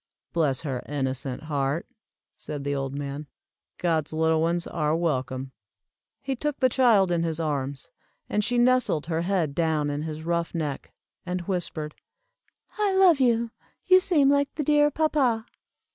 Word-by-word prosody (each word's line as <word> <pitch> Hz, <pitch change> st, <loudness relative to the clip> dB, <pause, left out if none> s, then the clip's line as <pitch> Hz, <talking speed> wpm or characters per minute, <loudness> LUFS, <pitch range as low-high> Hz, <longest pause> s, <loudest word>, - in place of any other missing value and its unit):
"Bless 150 Hz, -6 st, +1 dB
her 135 Hz, -6 st, -3 dB
innocent 130 Hz, -2 st, -3 dB
heart," 145 Hz, +1 st, -1 dB, 0.5 s
said 145 Hz, -2 st, -6 dB
the 145 Hz, 0 st, -1 dB
old 135 Hz, -1 st, -3 dB
man, 145 Hz, +1 st, -5 dB, 0.5 s
"God's 160 Hz, -4 st, 0 dB
little 160 Hz, 0 st, +2 dB
ones 170 Hz, +1 st, 0 dB
are 155 Hz, -2 st, 0 dB
welcome." 130 Hz, -5 st, -2 dB, 0.7 s
He 270 Hz, -1 st, -2 dB
took 295 Hz, +3 st, -3 dB
the 255 Hz, -, +4 dB
child 225 Hz, -8 st, +4 dB
in 170 Hz, -1 st, +1 dB
his 165 Hz, -1 st, -2 dB
arms, 140 Hz, -4 st, -3 dB, 0.4 s
and 210 Hz, -, 0 dB
she 245 Hz, +3 st, 0 dB
nestled 245 Hz, -10 st, +3 dB
her 165 Hz, 0 st, -1 dB
head 175 Hz, -5 st, 0 dB
down 155 Hz, -2 st, 0 dB
in 145 Hz, +1 st, -3 dB
his 155 Hz, 0 st, -5 dB
rough 170 Hz, +1 st, -1 dB
neck, 150 Hz, -4 st, -3 dB, 0.3 s
and 180 Hz, 0 st, -3 dB
whispered, 170 Hz, -4 st, -3 dB, 0.9 s
"I 405 Hz, -2 st, +2 dB
love 365 Hz, -6 st, +6 dB
you, 235 Hz, -2 st, +2 dB, 0.3 s
you 370 Hz, 0 st, +7 dB
seem 335 Hz, -7 st, +3 dB
like 285 Hz, 0 st, +2 dB
the 300 Hz, -, -1 dB
dear 295 Hz, +1 st, +4 dB
papa." 280 Hz, -7 st, +1 dB
165 Hz, 155 wpm, -26 LUFS, 145-240 Hz, 0.9 s, you